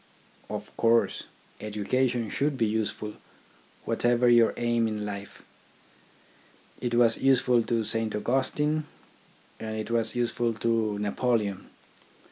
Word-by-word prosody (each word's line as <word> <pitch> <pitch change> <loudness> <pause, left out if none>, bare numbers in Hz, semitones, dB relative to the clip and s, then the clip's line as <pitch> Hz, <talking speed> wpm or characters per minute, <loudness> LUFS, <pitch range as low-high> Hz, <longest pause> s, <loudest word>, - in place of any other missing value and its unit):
Of - - -7
course, 115 0 +2 0.3
education 115 +3 -1
should 145 0 0
be 115 - +2
useful, 105 -1 -3 0.7
whatever 120 0 +2
your 120 -1 +5
aim 120 -1 +1
in 105 -1 -3
life. 100 -1 -7 1.4
It 120 -1 -1
was 120 -1 +4
useful 125 -2 +4
to 115 -1 0
Saint 110 0 -1
Augustine 145 +7 0 0.7
and 110 0 -5
it 110 +1 -5
was 115 0 +2
useful 120 -1 0
to 115 -2 0
Napoleon. 105 -1 -1
115 Hz, 110 wpm, -27 LUFS, 110-120 Hz, 1.4 s, your